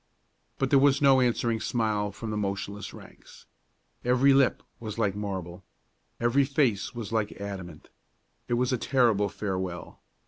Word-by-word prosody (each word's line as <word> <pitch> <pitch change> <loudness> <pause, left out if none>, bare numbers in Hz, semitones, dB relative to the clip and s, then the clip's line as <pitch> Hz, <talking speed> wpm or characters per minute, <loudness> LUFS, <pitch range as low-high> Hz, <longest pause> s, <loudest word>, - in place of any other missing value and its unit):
But 135 -1 -1
there 140 - +6
was 140 0 +4
no 135 -2 +5
answering 120 -2 +1
smile 110 -3 -1
from 110 +2 -6
the - - -2
motionless 100 0 -3
ranks. - - -15 0.6
Every 130 +3 +4
lip 135 -2 +3 0.2
was 110 -2 -6
like 105 -4 0
marble; 95 -4 -5 0.6
every 120 +4 +3
face 130 -6 0
was 115 -3 -6
like 110 -2 0
adamant. 95 -6 -8 0.6
It 120 - +1
was 125 +1 +1
a 125 - 0
terrible 115 -7 +2
farewell. 95 -4 -5
110 Hz, 145 wpm, -27 LUFS, 100-125 Hz, 0.6 s, there